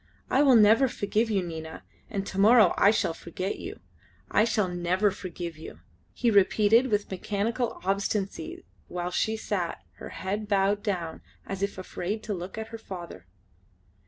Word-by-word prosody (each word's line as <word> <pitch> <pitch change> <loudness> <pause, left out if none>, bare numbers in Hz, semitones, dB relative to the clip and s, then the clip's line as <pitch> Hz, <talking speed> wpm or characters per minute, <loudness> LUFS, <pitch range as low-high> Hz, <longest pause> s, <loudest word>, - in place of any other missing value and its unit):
I 265 - +4
will 270 -4 +6
never 225 +4 +6
forgive 220 0 0
you, 200 -4 +1
Nina; 160 -2 -7 0.3
and 200 -4 -3
to 195 - -5
morrow 215 -2 +6
I 200 - +5
shall 210 -5 +1
forget 185 +4 -5
you! 410 +4 -7 0.5
I 215 - +4
shall 215 -4 +1
never 180 +3 +1
forgive 175 -3 -6
you," - - -10 0.3
he 240 -2 +1
repeated 215 +4 +4
with 210 -4 -1
mechanical 215 +5 -2
obstinacy 200 - -2 0.2
while 180 0 -4
she 220 +4 0
sat, 185 -6 -3
her - - -8
head 205 +3 -4
bowed 200 0 +2
down 175 -6 -3 0.2
as 195 -1 -5
if 200 -1 -2
afraid 190 +3 -4
to 215 - -3
look 180 +2 -6
at 220 0 -5
her 225 - -8
father. 175 - -9
200 Hz, 160 wpm, -27 LUFS, 185-220 Hz, 0.5 s, will